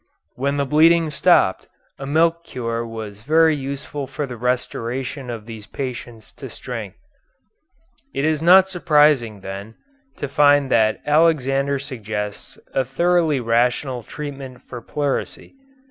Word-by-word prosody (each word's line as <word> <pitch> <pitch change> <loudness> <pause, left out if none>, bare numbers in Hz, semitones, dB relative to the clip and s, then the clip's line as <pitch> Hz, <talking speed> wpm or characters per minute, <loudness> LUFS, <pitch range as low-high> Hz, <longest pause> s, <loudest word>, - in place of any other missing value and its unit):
When 140 +2 -1
the 140 - +1
bleeding 160 +3 +4
stopped, 145 - +3 0.3
a 135 - -6
milk 165 +3 +2
cure 115 -5 -4
was 110 -3 -8
very 160 +4 +4
useful 140 0 -5
for 145 +2 -4
the 125 -3 -7
restoration 125 +2 -3
of 115 -3 -6
these 110 -2 -10
patients 120 -4 -7
to - - -6
strength. - - -7 1.1
It 135 +2 -1
is 155 -1 +1
not 185 +3 +7
surprising, 150 - +2
then, 100 +3 -8 0.4
to 145 - -3
find 145 -1 +3
that 110 -1 +2
Alexander 140 -3 +2
suggests 110 -7 -6 0.2
a 135 - +2
thoroughly 160 +2 +1
rational 125 +2 0
treatment 135 0 -8
for 120 -2 -9
pleurisy. 145 +2 -3
135 Hz, 130 wpm, -21 LUFS, 115-150 Hz, 1.1 s, not